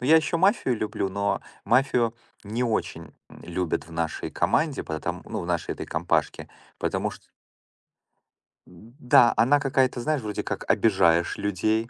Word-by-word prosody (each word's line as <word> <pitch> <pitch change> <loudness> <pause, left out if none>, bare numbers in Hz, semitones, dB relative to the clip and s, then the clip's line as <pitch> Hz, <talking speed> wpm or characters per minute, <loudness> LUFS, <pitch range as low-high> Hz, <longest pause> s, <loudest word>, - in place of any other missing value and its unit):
Но 125 - -3
я 160 +3 +7
ещё 160 +1 +1
"Мафию" 185 - +2
люблю, 105 -2 -2
но 100 +1 -1 0.2
"Мафию" 120 0 +2 0.3
не 110 +4 -2
очень, 115 -3 -3 0.2
м, - - -14
любят 90 -1 -3
в 85 - -14
нашей 80 -1 -3
команде, 155 -3 0
поэтом, 80 0 -4
ну, - - -5
в 85 - -6
нашей 85 -2 -1
этой - - -7
компашке, 80 -2 -1 0.3
потому - - -1
чт - - -12 1.5
Да, 120 - +2
она 145 +5 +4
какая-то, 130 -3 +1
знаешь, 150 +2 0
вроде 105 -2 -4
как - - -5
обижаешь 85 +1 +3
людей, 110 +3 0
110 Hz, 150 wpm, -25 LUFS, 90-130 Hz, 1.5 s, я